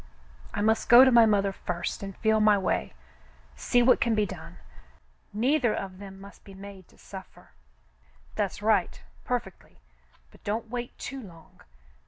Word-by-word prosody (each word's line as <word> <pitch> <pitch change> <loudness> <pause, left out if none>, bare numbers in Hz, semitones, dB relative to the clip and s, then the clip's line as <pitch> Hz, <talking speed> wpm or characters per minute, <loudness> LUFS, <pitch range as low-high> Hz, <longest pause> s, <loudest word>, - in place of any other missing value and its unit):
I - - -3
must 220 +1 +1
go 245 +2 +9
to 260 - +4
my 235 -2 +7
mother 200 -2 +2
first 175 -2 -5
and 195 -1 -7
feel 220 -1 +2
my 210 -1 +5
way 125 - -2 0.3
— - - -28 0.3
see 245 - +2
what 255 - +4
can 230 -1 +2
be 210 -1 +2
done. 170 -2 -10 0.7
Neither 245 +2 +1
of 185 -1 -6
them 195 -1 -10
must 200 +1 -14
be 195 - -13
made 195 -2 -11
to - - -24
suffer.'* 190 -2 -12 0.4
*' 65 -1 -30
That's - - -3
right, - - +1 0.2
perfectly - - -5 0.3
— - - -34
but - - -21
don't 220 +2 -3
wait 245 -1 -5
too 270 0 -7
long. 170 -7 -15
200 Hz, 175 wpm, -27 LUFS, 185-225 Hz, 0.7 s, go